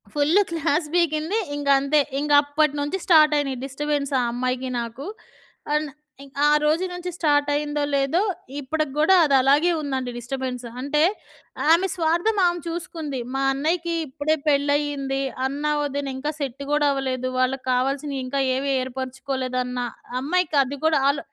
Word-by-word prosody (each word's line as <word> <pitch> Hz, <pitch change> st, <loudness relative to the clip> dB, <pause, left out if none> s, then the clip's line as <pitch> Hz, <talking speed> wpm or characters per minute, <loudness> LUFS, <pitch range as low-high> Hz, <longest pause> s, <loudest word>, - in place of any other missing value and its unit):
Full 300 Hz, +7 st, +3 dB
class 320 Hz, -1 st, 0 dB
పీకింది. 335 Hz, +2 st, +1 dB, 0.2 s
ఇంకంతే. 280 Hz, +1 st, +3 dB, 0.2 s
ఇంకప్పటి 290 Hz, 0 st, +3 dB
నుంచి 290 Hz, +6 st, -1 dB
start 310 Hz, -3 st, +6 dB
అయినయి 275 Hz, -3 st, -1 dB
డిస్టర్బెన్స్ 285 Hz, +1 st, -2 dB
ఆ -, -, +2 dB
అమ్మాయికి, 255 Hz, +1 st, -2 dB
నాకు. 235 Hz, +4 st, -7 dB, 0.7 s
అండ్ 300 Hz, 0 st, 0 dB, 0.3 s
ఇం 280 Hz, -, -14 dB, 0.2 s
ఆ -, -, +5 dB
రోజు 315 Hz, +5 st, +2 dB
నుంచి 355 Hz, 0 st, -5 dB
స్టాట్ 290 Hz, -3 st, +2 dB
అయిందో 295 Hz, 0 st, -1 dB
లేదో. 275 Hz, +6 st, +2 dB, 0.4 s
ఇప్పటికి 305 Hz, +1 st, -2 dB
గూడా 315 Hz, +5 st, +5 dB
అదలాగే 280 Hz, +4 st, +4 dB
ఉందండి 265 Hz, -4 st, -3 dB
డిస్టబెన్స్. 250 Hz, 0 st, -4 dB, 0.2 s
అంటే, 290 Hz, +3 st, 0 dB, 0.7 s
ఆమె 345 Hz, +4 st, +4 dB
స్వార్థం 345 Hz, +6 st, +1 dB
ఆమె 350 Hz, 0 st, -1 dB
చూసుకుంది. 330 Hz, -5 st, -4 dB, 0.2 s
మా 270 Hz, -, 0 dB
అన్నయ్యకి 335 Hz, +5 st, -1 dB
ఇప్పుడే 290 Hz, +3 st, 0 dB
పెళ్ళయ్యింది. 285 Hz, -1 st, +1 dB, 0.3 s
అన్న, 280 Hz, +2 st, -5 dB, 0.2 s
వదిన 285 Hz, 0 st, -3 dB
ఇంకా 295 Hz, +3 st, -2 dB
సెట్ 275 Hz, -1 st, -4 dB
కూడా 295 Hz, 0 st, +3 dB
అవలేదు. 260 Hz, -2 st, -2 dB
వాళ్ళకి 255 Hz, +1 st, 0 dB
కావాల్సినయి 275 Hz, +2 st, -1 dB
ఇంకా 275 Hz, +2 st, -1 dB
ఏవీ 275 Hz, +1 st, -1 dB
ఏర్పరుచుకోలేదన్న, 255 Hz, -1 st, -3 dB, 0.4 s
అమ్మాయికది 285 Hz, -3 st, +1 dB
కూడా 315 Hz, -2 st, +4 dB
అలో 280 Hz, 0 st, -1 dB
285 Hz, 135 wpm, -23 LUFS, 270-310 Hz, 0.7 s, స్టాట్